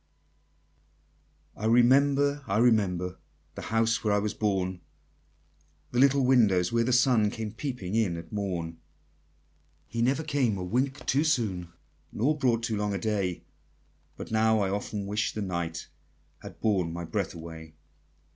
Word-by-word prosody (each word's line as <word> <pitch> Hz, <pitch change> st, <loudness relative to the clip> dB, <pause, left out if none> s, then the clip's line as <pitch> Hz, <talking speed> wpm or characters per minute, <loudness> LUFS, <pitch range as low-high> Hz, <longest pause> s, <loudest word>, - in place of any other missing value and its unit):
I 105 Hz, -, -6 dB
remember, 140 Hz, +4 st, +4 dB
I 100 Hz, -, 0 dB
remember, 95 Hz, -6 st, +2 dB, 0.3 s
The -, -, -7 dB
house 115 Hz, +1 st, 0 dB
where 105 Hz, -, +1 dB
I 105 Hz, -, +3 dB
was 105 Hz, +1 st, -1 dB
born, 95 Hz, -4 st, -1 dB, 1.1 s
The 120 Hz, -, 0 dB
little 140 Hz, 0 st, +4 dB
window 110 Hz, -8 st, +4 dB
where 115 Hz, 0 st, +2 dB
the 125 Hz, -, 0 dB
sun 120 Hz, -4 st, +4 dB
Came 110 Hz, 0 st, -5 dB
peeping 115 Hz, -6 st, -5 dB
in 105 Hz, -7 st, +1 dB
at 85 Hz, -1 st, -10 dB
morn; 90 Hz, -5 st, -3 dB, 1.1 s
He 115 Hz, +10 st, -4 dB
never 135 Hz, +6 st, +1 dB
came 140 Hz, -9 st, 0 dB
a 90 Hz, -, -4 dB
wink 130 Hz, +9 st, -1 dB
too 140 Hz, +3 st, +2 dB
soon, 105 Hz, -, 0 dB, 0.4 s
Nor 140 Hz, +8 st, +1 dB
brought 120 Hz, -5 st, +1 dB
too 115 Hz, -2 st, -1 dB
long 105 Hz, -1 st, -1 dB
a -, -, 0 dB
day, 95 Hz, -3 st, -2 dB, 0.7 s
But -, -, -8 dB
now, 110 Hz, 0 st, +3 dB
I 95 Hz, -1 st, 0 dB
often 100 Hz, 0 st, -3 dB
wish 105 Hz, +2 st, -1 dB
the 105 Hz, -, -3 dB
night 85 Hz, -3 st, -4 dB, 0.5 s
Had -, -, -11 dB
borne 95 Hz, -6 st, +1 dB
my 85 Hz, +1 st, -5 dB
breath 100 Hz, +1 st, -3 dB
away! 80 Hz, -1 st, -10 dB
110 Hz, 150 wpm, -28 LUFS, 95-125 Hz, 1.1 s, remember